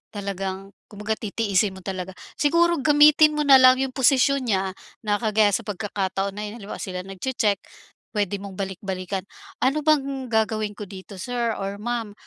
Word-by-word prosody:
talagang 195 -1 -5 0.2
kumbaga 210 +1 -4
titiisin 205 -2 0
mo 190 - -12
talaga. 190 -1 -5 0.2
Siguro 335 +2 +3
gamitin 300 +1 +6
mo 300 - +1
na 270 -2 +7
lang 255 0 +8
iyung 265 0 -2
posisyon 265 0 +3
niya, 190 -3 0 0.3
na 205 -1 0
kagaya 215 -2 +3
sa 200 - -2
pagkakataon 195 -1 -2
na 210 - -4
iyun. 210 - -8
Halimbawa, 200 - -7
sila 185 -2 -5
nagtse-tsek, 200 +1 -1 0.5
puwede 205 -2 -1
mong 195 -1 -9
balik-balikan. 190 0 -4 0.3
"Ano 275 +4 +1
ba 310 0 +4
ang 270 -2 -5
gagawin 215 -2 0
ko 210 - -6
dito," 195 0 -11
Sir 235 +3 -2
or 200 +1 -5
Ma'am, 235 -2 -3
210 Hz, 165 wpm, -24 LUFS, 195-255 Hz, 0.5 s, lang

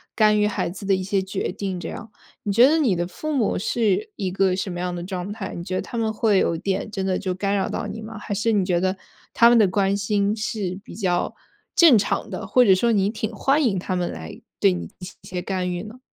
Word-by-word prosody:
干 215 -1 +4
预 210 - +3
孩 205 - -1
子 195 +3 -8
的 195 - +4
一 185 - -3
些 195 0 0
决 190 0 -3
定 190 -1 -4
这 165 - -5
样。 215 - -8 0.3
你 205 - -1
觉 235 +6 +7
得 315 +3 +3
你 235 - +2
的 175 - -1
父 310 +12 -5
母 245 -11 +1
是 230 - 0
一 190 -2 -3
个 190 0 +2
什 190 0 -3
么 175 - -5
样 180 0 -2
的 175 - -5
状 185 +1 -5
态？ 205 -3 -6
你 170 - -5
觉 185 0 -4
得 - - 0
他 235 - -7
们 220 -1 0
会 215 -2 +2
有 165 - +1
点 195 +3 -2
真 195 -2 -3
的 185 -1 0
就 185 -2 -2
干 200 +2 0
扰 195 - 0
到 - - -3
你 210 +2 -6
吗？ 220 +1 -8
还 205 - -5
是 215 +3 +1
你 200 -4 +2
觉 180 -2 +1
得 185 +1 0 0.4
他 235 - +6
们 240 - +5
的 210 - +5
关 195 +1 +1
心 200 0 0
是 210 -4 -3
比 250 - -11
较 180 -5 -1 0.4
正 330 -7 +7
常 205 - -1
的， - - -5
或 250 -1 +5
者 195 - +7
说 230 +5 +2
你 200 -2 +2
挺 220 -1 -3
欢 285 +3 +2
迎 210 -8 +1
他 185 +1 -2
们 180 -1 -1
来 80 0 -9 0.2
对 90 - +4
你 85 -1 -5
进 - - -24
行 180 0 -8
一 - - -14
些 180 -1 -4
干 185 -2 -2
预 175 +1 -4
呢？ 220 +4 -11
195 Hz, 290 characters per minute, -23 LUFS, 185-215 Hz, 0.4 s, 觉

